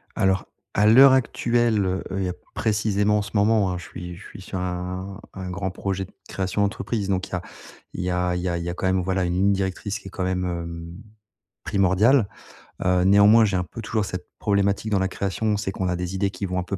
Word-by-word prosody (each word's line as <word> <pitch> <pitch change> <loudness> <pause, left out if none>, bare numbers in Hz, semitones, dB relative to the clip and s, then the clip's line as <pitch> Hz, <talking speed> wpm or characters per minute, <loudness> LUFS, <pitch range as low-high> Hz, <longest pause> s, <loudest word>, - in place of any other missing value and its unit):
Alors, 95 0 +1 0.3
à 105 - +3
l'heure 130 +4 +8
actuelle, 120 -4 +2
heu 95 0 -1
heu, 95 -2 -1 0.2
précisément, 105 -1 +1
en - - 0
ce 100 - -7
moment, 100 -2 +3
hein, 90 - -3
je 90 - -8
suis 90 -1 -8
je 100 - -12
suis 100 - -11
sur 95 0 -5
un 90 +2 -4
un 95 -1 -6
grand 95 +1 -3
projet 95 0 -3
de - - -20 0.2
création 95 +1 -2
d'entreprise, 100 0 -1
donc 95 0 0
il - - -19
y - - -10
a 90 - -1 0.5
il - - -4
y 90 - -1
a 90 0 0
il 90 - -2
y - - -1
a 85 - -1
il 85 - -4
y 85 - -3
a - - -2
quand 95 +1 -2
même, 95 0 +2
voilà, 95 0 0
une 90 0 0
ligne 100 +2 +3
directrice, 100 +2 -2
qui - - -12
est - - -9
quand 95 - -3
même, 90 0 -1
hem, 85 -1 -5 0.7
primordiale. 100 +5 +3 0.6
Heu, 90 -1 +3
néanmoins, 100 +3 +6
j'ai 95 -2 0
un 90 - 0
peu 100 +7 -9
toujours 110 -1 -1
cette 90 -1 -6
problématique 100 +1 +1
dans 100 - +3
la 95 - +1
création, 100 +2 -1
c'est 100 -2 -2
qu'on 95 -2 -2
a 90 - 0
des 90 +1 -4
idées 100 0 0
qui 100 - -4
vont 90 0 -2
un - - -2
peu 95 +1 -4
95 Hz, 245 wpm, -24 LUFS, 90-105 Hz, 0.7 s, l'heure